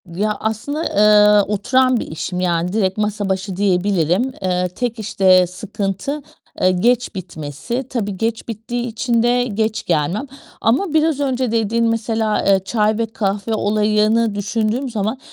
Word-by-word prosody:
Ya, 210 +2 0
aslında, 225 +9 -3
eee, 210 -2 +5
oturan 255 +5 +2
bir - - -5
işim 180 +3 -4
yani, 175 0 0
direkt 190 -3 0
masa 210 -1 -1
başı 190 0 -2
diyebilirim. 190 - +1
Eee, 180 -1 0
tek 235 +4 -4
işte 190 -3 +3
sıkıntı, 200 - -4 0.4
eee, 185 - +4
geç 230 +4 +1
bitmesi. 175 - -5
Tabii 205 -6 -3
geç 225 +1 -2
bittiği 240 +2 -4
için 235 +1 0
de 245 +1 +3
geç 220 -1 -2
gelmem 170 - 0 0.3
ama 285 - +1
biraz 315 -2 +2
önce 260 -4 0
dediğin 230 +1 +1
mesela, 225 -1 0
eee, 195 -1 +4
çay 215 0 +1
ve 230 - 0
kahve 210 0 -2
olayını 215 +1 +2
düşündüğüm 225 +5 -1
zaman, 220 +2 -2
215 Hz, 145 wpm, -19 LUFS, 195-235 Hz, 0.4 s, eee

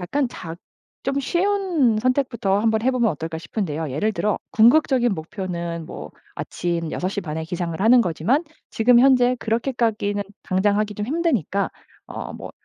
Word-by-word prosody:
약간 270 +10 0
작 165 -6 -8 0.5
좀 275 +1 0
쉬운 345 - +1
선택부터 240 -5 +1
한번 220 +1 +1
해보면 250 -2 +2
어떨까 160 +2 -5
싶은데요. 160 -2 -3
예를 180 +12 0
들어 210 0 0
궁극적인 245 -1 +4
목표는 170 -2 -5
뭐 - - -8 0.2
아침 170 -2 -3
6:30 180 -4 -3
에 160 - -3
기상을 170 0 -4
하는 235 +4 +6
거지만 200 - +1 0.3
지금 235 +2 +4
현재 255 -1 +5
그렇게까지는 225 -4 -1 0.3
당장 200 +2 +2
하기 215 -1 -1
좀 210 +1 -4
힘드니까 255 - 0 0.4
어 - - -6
뭐 - - -8
215 Hz, 315 characters per minute, -22 LUFS, 175-250 Hz, 0.5 s, 하는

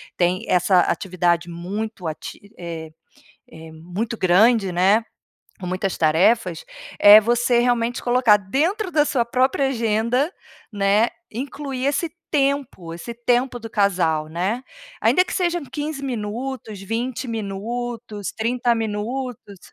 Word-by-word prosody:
tem 180 +4 0
essa 180 +1 +3
atividade 175 -2 0
muito 190 +3 -5
ati 155 - -6 0.2
eh 165 -2 -7 0.6
eh, 160 0 -11
muito 180 +9 -5
grande, 195 +2 +4
né, 195 +6 +3 0.6
com 180 - -6
muitas 185 +1 -2
tarefas 170 +3 +2 0.3
eh, 205 +1 +9
você, 240 +2 +2
realmente, 240 0 +1
colocar 240 -4 +4
dentro 320 - -1
da 300 -2 +4
sua 245 -5 +1
própria 260 +3 +1
agenda, 235 - 0 0.4
né, 205 +2 +3 0.2
incluir 270 +2 -5
esse 290 +4 0 0.2
tempo 275 - -1
esse 175 +8 -7
tempo 245 +1 +1
do 230 -1 -8
casal, 175 -6 +1
né? 190 +10 -2 0.4
Ainda 365 - +4
que - - -6
sejam 350 -4 0
15 290 0 -5
minutos, 235 -2 -4
20 235 +6 -3
minutos, 225 0 -4
30 235 +1 0
minutos. 225 0 -4
225 Hz, 120 wpm, -22 LUFS, 190-250 Hz, 0.6 s, eh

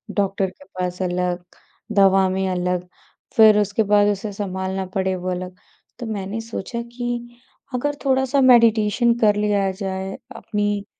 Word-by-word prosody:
Doctor 195 -1 0
के 285 +9 -18
पास 180 0 -3
अलग, 180 -1 -1 0.5
दवा 195 -1 +4
में 190 0 -1
अलग, 180 0 -1 0.5
फिर 215 -2 +7
उसके 205 +2 +1
बाद 205 0 +4
उसे 205 +1 -2
संभालना 190 -1 -3
पड़े, 190 -1 0
वो 185 0 -4
अलग। 180 0 -5 0.4
तो 240 - -5
मैंने 210 0 -4
सोचा 230 +1 -5
कि 240 -1 -4 0.4
अगर 290 +4 -1
थोड़ा-सा 265 +1 +2
मेडिटेशन 235 -2 +5
कर 210 -2 +4
लिया 205 -2 +1
जाए, 190 0 -5 0.2
अपनी 205 -2 -2
200 Hz, 140 wpm, -21 LUFS, 190-225 Hz, 0.5 s, फिर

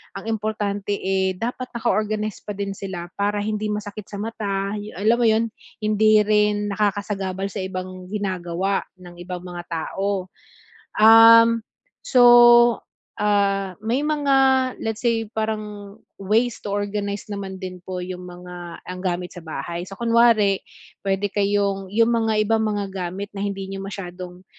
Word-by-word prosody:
ang 195 +3 -6
importante, 205 -2 -2
eh, 190 0 0
dapat 250 +4 -4
naka 235 - -1
organize 215 0 -1
pa 210 - -5
din 200 0 -4
sila, 175 -3 -6
para 205 0 0
hindi 215 0 -2
masakit 210 0 -5
sa 200 - -7
mata, 200 -2 -3
a - - -3 0.2
alam 220 +3 +3
mo 240 - +3
'yon? 220 0 +3 0.4
Hindi 215 0 +4
rin 210 0 +2
nakakasagabal 200 -2 -1
sa 200 - -8
ibang 185 -1 -6
ginagawa 190 -2 -2 0.2
ng 175 -1 -13
ibang 180 -1 -5
mga 175 -1 -7
tao. 190 +3 -2 0.7
Uhm, 230 +1 +8 0.4
so, 250 - +4 1.0
ah, 200 -2 +1
may 240 +7 0
mga, 295 -2 +1 0.5
let's 225 -1 -3
say 230 -2 +1
parang 210 -2 -4 0.2
ways 225 +4 +1
to - - -6
organize 205 0 -3
naman 195 -2 -5
din 185 -1 -7
po 185 0 -5
yung 180 0 -7
mga, 175 -1 -10
ang 180 0 -7
gamit 180 -1 -2
sa 175 - -9
bahay. 165 +2 -5
So, 195 - -10
kunwari 230 -4 +4 0.4
puwede 195 0 0
kayong 200 -1 0
yung 230 +2 +3
mga 225 -1 +1
ibang 225 +1 +2
mga 205 -2 -2
gamit 190 +2 -5
na 195 - -5
hindi 195 -1 -3
nyo 195 0 -5
masyadong 180 -2 -8
200 Hz, 150 wpm, -22 LUFS, 190-215 Hz, 1.0 s, Uhm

